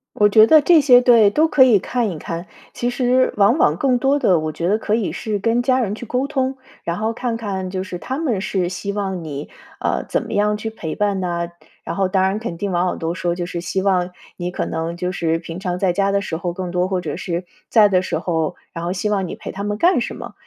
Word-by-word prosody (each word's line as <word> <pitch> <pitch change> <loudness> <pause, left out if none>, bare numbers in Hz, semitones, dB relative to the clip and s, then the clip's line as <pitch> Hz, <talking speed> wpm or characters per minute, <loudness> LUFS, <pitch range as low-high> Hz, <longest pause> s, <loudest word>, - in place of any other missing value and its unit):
我 210 - +5
觉 215 +2 +6
得 315 - +7
这 330 0 +5
些 250 -3 +7
对， 235 -4 +6
都 310 +10 +3
可 280 -4 +5
以 245 -5 +6
看 235 +3 -1
一 170 - -5
看。 170 +3 -6 0.3
其 240 - -1
实 250 +1 +2
往 205 +7 +4
往 155 - +3
更 255 +3 +2
多 275 +3 +2
的， 180 - +3
我 155 0 -3
觉 170 +2 -3
得 205 +3 +3
可 215 -1 0
以 225 -4 -1
是 215 -2 -3
跟 230 +4 +1
家 255 +1 +2
人 210 -5 -1
去 240 - -8
沟 250 +4 -1
通， 265 -2 -1 0.3
然 170 0 -2
后 220 +2 -1
看 235 -1 -2
看 195 -4 -4
就 185 0 -3
是， 180 -2 -7
他 265 - -4
们 255 -11 -1
是 185 -3 -1
希 195 +2 -4
望 195 -4 -3
你， 145 -2 -6 0.3
呃， - - -1
怎 - - 0
么 - - -7
样 210 +1 +2
去 220 +1 -4
陪 160 -8 -5
伴 205 -2 0
呢？ 170 -2 -2 0.4
然 - - -4
后 195 -1 +1
当 190 0 +1
然 195 +2 0
肯 220 -7 -5
定 200 +3 -3
往 175 0 +1
往 - - -2
都 165 +1 -2
说， 175 -1 -2
就 175 - -3
是 175 -1 -5
希 190 +2 -2
望 185 -2 +1 0.2
你 175 0 -4
可 - - -2
能 165 +1 -3
就 180 +1 -2
是 165 -2 0
平 170 0 -7
常 180 -2 -2
在 185 -2 +2
家 200 +1 +1
的 200 - +1
时 160 -4 -4
候 175 0 -3
更 180 0 -5
多， 180 +1 0
或 185 -1 -1
者 155 -4 -4
是 175 0 -4 0.2
在 215 -3 +6
的 185 -2 +2
时 185 - -2
候， 160 -3 -1 0.2
然 165 - -5
后 175 - -2
希 195 +3 -2
望 195 -3 0
你 - - -6
陪 - - -7
他 200 - -6
们 205 0 -2
干 350 - +3
什 - - -4
么。 - - -9
195 Hz, 285 characters per minute, -20 LUFS, 175-230 Hz, 0.4 s, 得